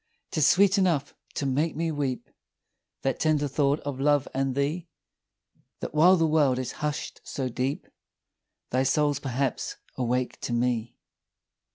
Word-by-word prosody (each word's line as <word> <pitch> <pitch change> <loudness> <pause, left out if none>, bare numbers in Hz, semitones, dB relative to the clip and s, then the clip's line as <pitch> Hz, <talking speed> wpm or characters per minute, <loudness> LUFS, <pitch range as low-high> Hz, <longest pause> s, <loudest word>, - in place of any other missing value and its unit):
'Tis 150 -2 +3
sweet 195 +3 +5
enough 165 -7 +1 0.2
to 140 - -1
make 145 +4 0
me 165 0 -1
weep, 140 -4 -2 0.8
That 135 -1 0
tender 150 -2 +2
thought 140 +1 +1
of 140 -2 -5
love 145 -1 +3
and 135 -1 0
thee, 150 +5 -1 0.9
That - - -5
while 170 +5 +6
the 165 - +3
world 150 -5 +3
is 130 -1 -3
hush'd 150 0 -3
so 130 -2 -3
deep, 130 +4 -2 0.9
Thy 130 - +2
soul's 145 +1 +2
perhaps 135 -2 -2 0.2
awake 125 0 -1
to 120 - -3
me! 120 -1 -1
140 Hz, 145 wpm, -27 LUFS, 130-155 Hz, 0.9 s, while